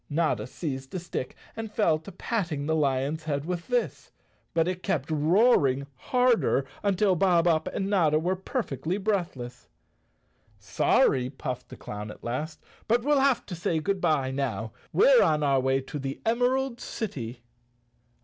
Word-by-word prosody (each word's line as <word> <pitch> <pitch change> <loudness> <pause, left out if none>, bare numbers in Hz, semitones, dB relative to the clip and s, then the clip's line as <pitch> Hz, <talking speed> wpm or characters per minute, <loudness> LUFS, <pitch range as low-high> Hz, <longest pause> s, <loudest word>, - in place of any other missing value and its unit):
Notta 160 +2 0
seized 135 -2 -5
a - - -1
stick 165 -6 -5 0.2
and 225 -1 -5
fell 170 -8 +2
to 160 +5 -11
patting 175 -7 -2
the 160 +1 +1
lion's 145 +1 0
head 145 -2 -2
with 175 0 -4
this, 245 -1 -2 0.4
but 165 -1 +1
it 185 0 -2
kept 160 -7 -1
roaring 155 - +3
harder 245 - +2 0.2
until 200 -1 +2
Bob 175 -1 +3
Up 160 -2 +2
and 195 - -2
Notta 170 -7 +3
were 175 +4 0
perfectly 185 - -3
breath¬ 195 -5 -1
less. 125 0 -9 0.5
" - - -40
Sorry," 125 -1 +2
puffed 130 -2 -6
the - - -10
clown 105 +1 -7
at - - -11
last, 150 +7 -4
" - - -30
but 235 +1 +2
we'll 290 +1 +3
have 270 -2 +2
to 185 - -7
say 170 -1 -1
good 195 +4 -1
bye 150 -6 +1
now. 115 -5 -2 0.2
We're - - +6
on 150 -1 +3
our 140 -2 +3
way 135 +1 +1
to 145 +2 -6
the 135 0 -4
Emerald 245 +2 +1
City." 125 - -5
160 Hz, 170 wpm, -27 LUFS, 135-200 Hz, 0.5 s, We're